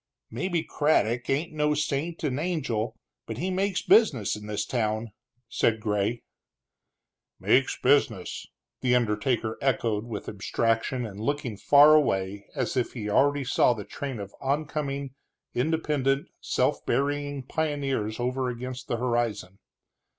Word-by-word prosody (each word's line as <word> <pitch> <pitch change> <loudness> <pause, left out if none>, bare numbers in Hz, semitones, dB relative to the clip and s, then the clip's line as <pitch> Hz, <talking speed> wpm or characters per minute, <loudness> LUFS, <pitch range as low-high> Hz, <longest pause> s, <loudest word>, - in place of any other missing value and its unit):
"Maybe 175 -3 -1
Craddock 125 -6 +1
ain't 155 +5 0
no 150 -1 +1
saint 150 +3 -2
and 140 -2 0
angel, 120 -10 -2 0.3
but 115 - -5
he 185 +7 -2
makes 190 0 0
business 140 - +4
in 105 0 -9
this 105 0 -2
town," 110 -2 -1 0.4
said 115 -1 +1
Gray. 105 +1 -1 1.2
"Makes 135 +1 +3
business!" 125 -8 +1 0.3
the 125 -1 +3
undertaker 110 0 0
echoed, 115 -5 0
with 110 -4 -6
abstraction 115 +4 -1
and 100 -2 -8
looking 125 -1 -2
far 145 +8 +7
away 100 -9 +1
as - - -1
if 125 -2 0
he 105 -4 -4
already 145 +5 +3
saw 125 -1 +3
the 105 -3 -7
train 135 -5 -5
of 100 -1 -7
oncoming, 140 -1 -2 0.4
independent, 140 -1 0
self - - 0
burying 145 +1 -1
pioneers 135 -7 -2
over 125 +1 -1
against 125 +1 -6
the 120 - -1
horizon. 115 -6 -1
125 Hz, 130 wpm, -27 LUFS, 110-145 Hz, 1.2 s, far